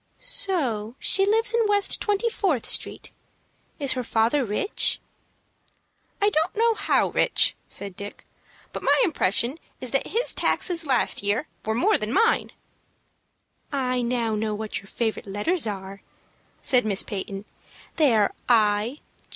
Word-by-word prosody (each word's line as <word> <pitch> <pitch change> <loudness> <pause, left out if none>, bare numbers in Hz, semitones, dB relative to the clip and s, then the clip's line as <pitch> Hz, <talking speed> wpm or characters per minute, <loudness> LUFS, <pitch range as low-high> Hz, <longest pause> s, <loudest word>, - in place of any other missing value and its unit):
"So 265 - -2
she 390 0 +3
lives 450 +3 +2
in 470 - +3
West 410 -1 +3
Twenty 415 +2 0
Fourth 380 - 0
Street. - - -2 0.7
Is 280 -3 +1
her 255 -1 -3
father 230 +5 +1
rich?" 225 - 0 1.2
"I 410 +1 +3
don't 320 -1 0
know 460 +1 +3
how 410 -2 +1
rich," - - +2
said 200 -2 -5
Dick; 200 +1 -9 0.5
"but - - -5
my - - +3
impression 270 - +1 0.2
is 255 -2 -5
that 275 - +1
his 470 +4 0
taxes 335 -3 0
last 260 -3 +2
year 205 +8 0 0.2
were 220 +1 -1
more 420 - +3
than 215 +1 -3
mine." 455 - +2 1.2
"I 255 -3 0
know 235 -2 -1
now 215 0 -1
what 215 0 -4
your 195 - -16
favorite 220 0 -3
letters 230 - +1
are," 195 -1 -6 0.6
said 250 -2 +3
Miss 200 -3 -1
Peyton. 195 0 -6 0.5
"They 290 -8 +4
are 210 -2 +2 0.2
I. 220 +3 +2
250 Hz, 145 wpm, -24 LUFS, -, 1.2 s, They